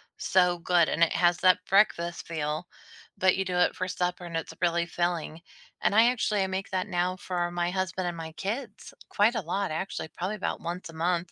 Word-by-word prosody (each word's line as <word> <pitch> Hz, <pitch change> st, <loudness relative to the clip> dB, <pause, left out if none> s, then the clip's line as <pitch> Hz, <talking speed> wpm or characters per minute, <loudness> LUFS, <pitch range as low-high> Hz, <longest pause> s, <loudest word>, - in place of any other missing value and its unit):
so 180 Hz, -2 st, +2 dB
good 170 Hz, -1 st, +3 dB
and 170 Hz, -, +2 dB
it 165 Hz, -, +3 dB
has 175 Hz, 0 st, +3 dB
that 185 Hz, 0 st, +4 dB
breakfast 175 Hz, -4 st, +2 dB
feel, 155 Hz, +1 st, -3 dB, 0.5 s
but 185 Hz, 0 st, +4 dB
you 190 Hz, -, 0 dB
do 180 Hz, -1 st, -3 dB
it 180 Hz, -, +3 dB
for 185 Hz, -, -2 dB
supper 180 Hz, 0 st, -2 dB
and 170 Hz, -1 st, -4 dB
it's 165 Hz, -, -5 dB
really 170 Hz, -1 st, +2 dB
filling. 170 Hz, -2 st, -2 dB, 0.4 s
And 205 Hz, -, +2 dB
I 235 Hz, +3 st, +6 dB
actually, 215 Hz, -4 st, 0 dB
I -, -, -1 dB
make 190 Hz, +1 st, -3 dB
that 185 Hz, +2 st, -1 dB
now 180 Hz, -1 st, 0 dB
for 175 Hz, -2 st, -2 dB
my 175 Hz, 0 st, -1 dB
husband 185 Hz, -1 st, -2 dB
and 175 Hz, -, -3 dB
my 160 Hz, -1 st, -6 dB
kids 215 Hz, +4 st, -5 dB, 0.2 s
quite 220 Hz, +4 st, +3 dB
a 225 Hz, -, 0 dB
lot, 190 Hz, +1 st, -2 dB
actually, 160 Hz, -1 st, -4 dB
probably 185 Hz, +6 st, -4 dB
about 195 Hz, -, -3 dB
once 175 Hz, 0 st, -5 dB
a -, -, -10 dB
month. 170 Hz, +1 st, -1 dB
180 Hz, 210 wpm, -28 LUFS, 170-190 Hz, 0.5 s, I